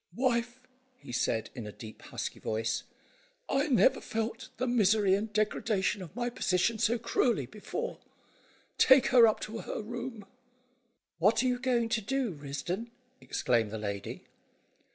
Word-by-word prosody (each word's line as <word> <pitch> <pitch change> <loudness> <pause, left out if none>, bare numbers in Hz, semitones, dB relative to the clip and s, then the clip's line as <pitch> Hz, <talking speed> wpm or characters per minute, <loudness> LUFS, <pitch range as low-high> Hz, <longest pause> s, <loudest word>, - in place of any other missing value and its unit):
"Wife," 245 0 0 0.4
he 250 - -11
said, 115 -2 0
in 115 -4 -6
a - - -6
deep, 110 +1 -11
husky - - -5
voice, 110 0 -2 0.6
"I 275 +3 +1
never 265 -1 +4
felt 225 +1 -3
the 250 - 0
misery 215 -5 +3
and 210 +3 0
degradation 210 -2 0
of 175 -4 -9
my 240 0 -1
position 215 +1 +1
so 235 +3 +2
cruelly 230 - +1
before. 205 - -5 0.8
Take 265 0 +6
her 245 -3 +8
up 215 - +1
to 225 +1 -5
her - - -5
room." 235 -1 -6 0.9
"What 220 +7 +4
are - - +2
you 250 -1 0
going 245 -3 +1
to 230 -1 +1
do, 260 +1 -1
Risdon?" 150 - -4 0.3
exclaimed 115 -4 0
the 110 - -5
lady. 100 -2 -5
220 Hz, 150 wpm, -30 LUFS, 170-240 Hz, 0.9 s, her